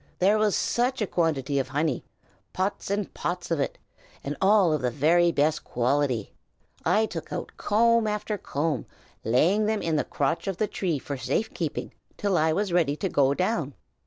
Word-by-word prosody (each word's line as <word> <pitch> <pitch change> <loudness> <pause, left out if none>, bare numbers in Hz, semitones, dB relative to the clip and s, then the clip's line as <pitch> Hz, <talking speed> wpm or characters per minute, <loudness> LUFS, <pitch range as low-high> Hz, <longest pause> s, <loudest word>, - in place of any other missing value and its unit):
There 205 +4 +3
was 215 -2 +2
such 250 +2 0
a 210 - +1
quantity 150 -6 0
of 135 - -1
honey, 145 0 -1 0.5
pots 190 +2 -2
and 200 0 -2
pots 175 0 -4
of 165 - +1
it! 140 - -2 0.5
and 145 +1 -3
all 195 -4 +5
of 150 - 0
the 125 - +1
very 170 +7 +3
best 155 0 +1
quality. 125 -2 0 0.5
I 205 +6 +3
took - - -7
out - - -4
comb 230 +1 +3
after 210 0 -2
comb, 145 -4 -2 0.4
laying 175 - +3
them 220 -1 0
in 160 -2 +1
the - - +1
crotch 145 +7 -1
of 195 -3 -2
the 215 - +1
tree 180 -6 -2
for 140 +1 -5
safe 130 - -1
keeping 160 -4 -4 0.2
till 200 -2 0
I 160 -1 +3
was 195 +2 -1
ready 160 -5 +2
to 190 +5 -2
go 140 -3 +3
down." 170 - -1
170 Hz, 185 wpm, -26 LUFS, 145-205 Hz, 0.5 s, all